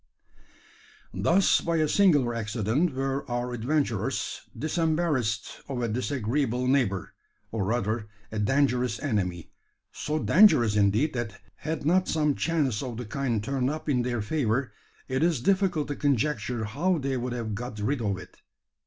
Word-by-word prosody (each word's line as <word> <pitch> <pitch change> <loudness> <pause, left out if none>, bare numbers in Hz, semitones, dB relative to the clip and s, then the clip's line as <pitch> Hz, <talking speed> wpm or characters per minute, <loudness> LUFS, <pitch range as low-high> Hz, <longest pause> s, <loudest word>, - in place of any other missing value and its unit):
Thus 185 +3 +3
by 170 0 -1
a 155 -1 +2
singular 150 -10 +4
accident 115 - 0
were 135 +1 -1
our 120 0 -2
adventurers 120 -2 -1 0.2
disembarrassed 155 -9 0
of 130 -3 -3
a - - +1
disagreeable 125 +1 -1
neighbour 125 -9 +1 0.4
or 110 -4 -1
rather, 110 0 -1 0.2
a 110 - -3
dangerous 125 0 +2
enemy 95 - -2 0.4
so 150 +1 -3
dangerous, 155 - +5
indeed, 105 +9 +3
that 115 -5 -4 0.2
had 155 -2 -4
not 185 +4 +3
some 150 -2 +2
chance 145 -9 0
of 125 -4 -5
the 125 - -5
kind 115 -2 -1
turned 130 +1 0
up 155 +2 -5
in 130 -4 +2
their 120 -3 -1
favour, 130 0 0 0.3
it 130 +1 -1
is 165 -4 +2
difficult 185 0 +1
to 145 - -2
conjecture 135 -4 0
how 165 - 0
they 135 -2 -2
would 125 0 -2
have 115 -3 -3
got 120 +2 -5
rid 120 +6 -1
of 100 -3 -1
it. 95 - -12
125 Hz, 150 wpm, -27 LUFS, 110-150 Hz, 0.4 s, dangerous